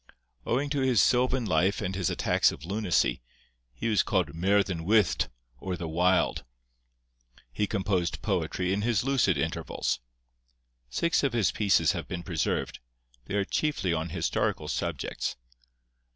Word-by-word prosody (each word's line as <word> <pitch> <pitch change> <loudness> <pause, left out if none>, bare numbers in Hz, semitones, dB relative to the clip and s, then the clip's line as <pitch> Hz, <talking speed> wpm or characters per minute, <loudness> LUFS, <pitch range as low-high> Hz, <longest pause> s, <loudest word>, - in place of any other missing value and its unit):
Owing 140 +4 0
to 145 -2 0
his 130 -4 +3
sylvan 125 +2 +3
life 90 +1 +2
and 95 - -2
his 95 -3 0
attacks - - +2
of 70 - -9
lunacy, 95 - +1 0.5
he - - -4
was 110 -3 +3
called 95 -5 0
Merddyn 95 0 +1
Wyllt, 105 0 +3 0.3
or 90 +2 -4
the 85 0 -5
Wild. 90 +1 +2 1.1
He 105 - 0
composed 95 -4 -1
poetry 90 0 -1
in 100 - 0
his 115 -2 +1
lucid 130 -9 +2
intervals. 80 -4 -2 0.9
Six 170 - +1
of 140 -4 0
his 115 -5 +2
pieces 95 -7 +3
have 85 -4 -5
been 85 -1 -5
preserved: 85 -5 -2 0.5
they 100 - -4
are 100 -1 +1
chiefly 100 - 0
on 80 +1 -2
historical - - -1
subjects. - - -3
95 Hz, 140 wpm, -28 LUFS, 85-110 Hz, 1.1 s, his